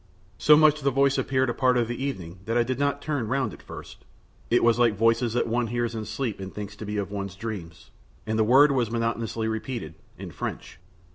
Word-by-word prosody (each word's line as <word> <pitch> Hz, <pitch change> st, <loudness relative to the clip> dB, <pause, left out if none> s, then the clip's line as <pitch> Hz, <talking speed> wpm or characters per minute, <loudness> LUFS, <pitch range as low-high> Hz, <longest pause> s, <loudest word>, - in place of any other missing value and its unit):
So 150 Hz, 0 st, +7 dB
much 155 Hz, -1 st, +5 dB
the 140 Hz, -, +2 dB
voice 140 Hz, +1 st, +2 dB
appeared 130 Hz, -1 st, +1 dB
a -, -, -4 dB
part 130 Hz, 0 st, +2 dB
of 120 Hz, -2 st, +1 dB
the 120 Hz, +3 st, -4 dB
evening 90 Hz, -11 st, -5 dB
that 115 Hz, +2 st, 0 dB
I 120 Hz, -, +4 dB
did 130 Hz, +2 st, -3 dB
not 145 Hz, 0 st, 0 dB
turn 145 Hz, -7 st, -2 dB
round 130 Hz, -2 st, -1 dB
at -, -, -12 dB
first; -, -, -11 dB, 0.5 s
it 120 Hz, -, +3 dB
was 115 Hz, 0 st, +4 dB
like 115 Hz, -3 st, +4 dB
voices 115 Hz, +2 st, +2 dB
that 120 Hz, -, +1 dB
one 120 Hz, +1 st, 0 dB
hears 120 Hz, 0 st, -2 dB
in 110 Hz, -1 st, -4 dB
sleep 110 Hz, 0 st, -3 dB
and 95 Hz, 0 st, -6 dB
thinks 100 Hz, -1 st, -7 dB
to 105 Hz, -, -7 dB
be 105 Hz, 0 st, -3 dB
of 100 Hz, -1 st, -3 dB
one's 100 Hz, -2 st, -5 dB
dream. 100 Hz, -5 st, -5 dB, 0.6 s
And 110 Hz, 0 st, -1 dB
the -, -, +5 dB
word 135 Hz, +6 st, +6 dB
was 125 Hz, -5 st, +1 dB
monotonously 115 Hz, -1 st, -2 dB
repeated, 110 Hz, -6 st, -4 dB, 0.2 s
in -, -, -8 dB
French. -, -, -6 dB
115 Hz, 225 wpm, -26 LUFS, 110-130 Hz, 0.6 s, So